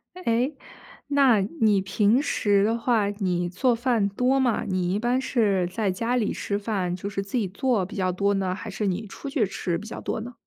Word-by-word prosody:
诶， 260 -4 0 0.5
那 275 -6 +4 0.2
你 210 -3 +4
平 205 +6 +2
时 205 -8 +2
的 225 +1 +1
话 225 -4 +1
你 185 -4 -1
做 240 +8 +1
饭 230 -4 +1
多 250 +6 +1
吗？ 245 -3 +1
你 185 -1 0
一 205 - 0
般 240 +3 +1
是 210 -8 +1
在 195 +3 -1
家 230 +7 -1
里 220 -4 0
吃 200 - -2
饭 200 -4 -2
就 195 +2 -5
是 195 -1 -3
自 200 +6 -3
己 215 -5 0
做 215 +1 0
比 195 - -10
较 185 -3 0
多 200 +3 +1
呢， 190 -2 0
还 190 - -7
是 210 - -2
你 195 +4 -2
出 275 +7 -8
去 270 -6 +1
吃 180 -3 -2
比 210 +5 -9
较 - - -7
多 - - -3
呢？ 240 +3 -7
210 Hz, 230 characters per minute, -25 LUFS, 195-240 Hz, 0.5 s, 那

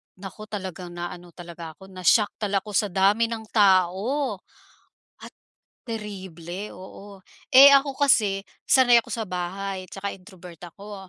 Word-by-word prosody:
Naku, 195 +3 -10
talagang 185 -4 -7
na 175 0 -5
ano 175 -1 -12
talaga 170 -2 -10
ako, 190 +5 -15
na-shock 185 +3 +2
talaga 205 -2 -4
ako 205 +2 -2
sa 205 +2 +1
dami 200 +5 +2
ng 225 -1 -6
tao, 200 +5 +2 0.8
at - - -10 0.5
terible, 190 -4 -7
oo. 195 +2 -12 0.3
Eh, 275 +2 +9
ako 275 -1 +2
kasi, 210 -9 +2 0.2
sanay 245 -3 +6
ako 245 - -18
sa 225 +1 -3
bahay 185 +1 -5
'tsaka 200 0 -5
introvert 180 -3 -14
ako. 195 +2 -11
195 Hz, 140 wpm, -24 LUFS, 180-215 Hz, 0.8 s, Eh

